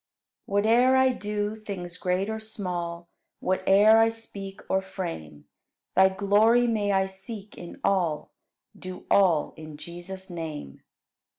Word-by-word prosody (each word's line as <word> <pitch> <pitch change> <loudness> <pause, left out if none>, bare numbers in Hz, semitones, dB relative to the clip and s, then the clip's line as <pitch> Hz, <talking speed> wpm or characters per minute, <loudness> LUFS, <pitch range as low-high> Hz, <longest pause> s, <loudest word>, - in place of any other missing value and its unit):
17. 205 0 +1
Whate'er 250 +3 +5
I 260 0 +5
do, 210 -3 -2
things 195 -5 -7
great 180 +2 -1
or 220 0 -3
small 175 -6 -5 0.3
Whate'er 200 +4 +5
I 225 0 +5
speak 200 -3 -8
or 190 - +1
frame. 165 - -7 0.5
Thy 190 +1 +6
glory 205 +5 +3
may 215 -3 +1
I 190 -1 +3
seek 195 +2 -8
in 175 - -10
all, 175 -6 0 0.4
Do 185 0 -9
all 180 -6 +4
in 155 -1 -9
Jesus' 175 +4 -8
name. 155 - -7
195 Hz, 130 wpm, -26 LUFS, 175-215 Hz, 0.5 s, Thy